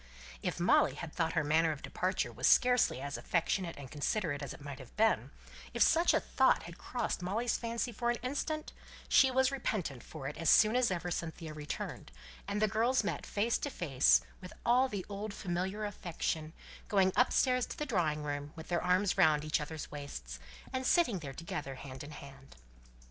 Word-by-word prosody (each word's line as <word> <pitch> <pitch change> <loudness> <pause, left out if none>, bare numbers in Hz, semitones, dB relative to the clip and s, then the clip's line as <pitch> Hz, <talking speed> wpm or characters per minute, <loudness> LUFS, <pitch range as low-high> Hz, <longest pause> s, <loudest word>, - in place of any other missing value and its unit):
If - - -2
Molly - - +4
had - - -7
thought - - 0
her - - +1
manner 160 +2 +3
of 150 - -7
departure 185 +2 -1
was - - 0
scarcely 250 - +4
as 140 +1 -4
affectionate 170 0 -1
and 140 -3 -9
considerate 150 0 -1
as 140 - -5
it - - -9
might 140 -1 -8
have 130 - -13
been, 225 +1 +2 0.5
if - - +5
such 335 +2 +4
a - - +4
thought - - +2
had - - -10
crossed - - -3
Molly's 220 +7 -1
fancy 235 0 -2
for 240 +2 -1
an 240 - +1
instant, 305 +4 -3 0.3
she 265 - +6
was 260 +1 +3
repentant 200 - -2
for 135 0 -8
it 150 - -6
as 165 -3 +1
soon 215 +1 +6
as 250 -1 +3
ever 175 -1 -2
Cynthia 165 -1 -4
returned, 150 - -6 0.4
and 205 - -1
the 215 - +3
girls 225 +4 +2
met 205 - -1
together - - -12
face 220 +3 +2
to 285 - -3
face, 140 - +3 0.2
with 180 - -9
all 255 +2 +4
the 200 -5 -4
old 205 +1 -5
familiar 190 +3 -2
affection, 165 -5 -3 0.3
going 190 -2 +3
upstairs 250 0 +3
to - - -7
the 300 - -2
drawing 165 - 0
room, 145 0 -4
with 160 0 -10
their 175 -1 0
arms 185 +2 +2
round 155 -1 +4
each 155 +1 +1
other's 155 +1 -6
waists, 105 - -7 0.3
and 260 -1 -1
sitting 285 - +3
there 140 -4 -7
together 145 -4 -5
hand 130 0 -8
in 145 - -9
hand. 135 -2 -12
180 Hz, 195 wpm, -33 LUFS, 150-225 Hz, 0.5 s, she